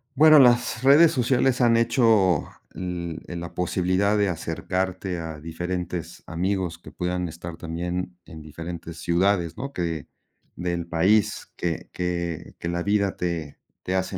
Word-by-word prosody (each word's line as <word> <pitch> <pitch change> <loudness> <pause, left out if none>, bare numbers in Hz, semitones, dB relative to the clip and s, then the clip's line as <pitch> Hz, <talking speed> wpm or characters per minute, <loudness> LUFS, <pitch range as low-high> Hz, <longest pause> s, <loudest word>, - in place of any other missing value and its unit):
Bueno, 155 +1 +8
las 120 -2 +4
redes 145 +5 +7
sociales 130 0 +2
han 115 -1 +5
hecho, 115 - +3 0.3
en 85 -3 -5 0.2
la 85 0 -7
posibilidad 95 +3 +1
de 100 -1 +3
acercarte 90 +2 -2
a 80 -2 -6
diferentes 85 +1 -4
amigos 90 0 -1
que 85 - -13
puedan 90 -1 -2
estar 85 +1 -8
también 90 +2 -4
en 80 -1 -10
diferentes 80 +2 -7
ciudades, 85 -1 +1
¿no? 140 +1 -5
Que 85 - -3 0.5
del 85 -1 -2
país, 95 +5 +1
que 85 -2 -3
que 85 -2 -3
que - - -4
la 85 0 -1
vida 100 -1 +1
te 85 -4 -3 0.3
te 95 - -2
hace 95 0 -1
90 Hz, 140 wpm, -25 LUFS, 85-100 Hz, 0.5 s, Bueno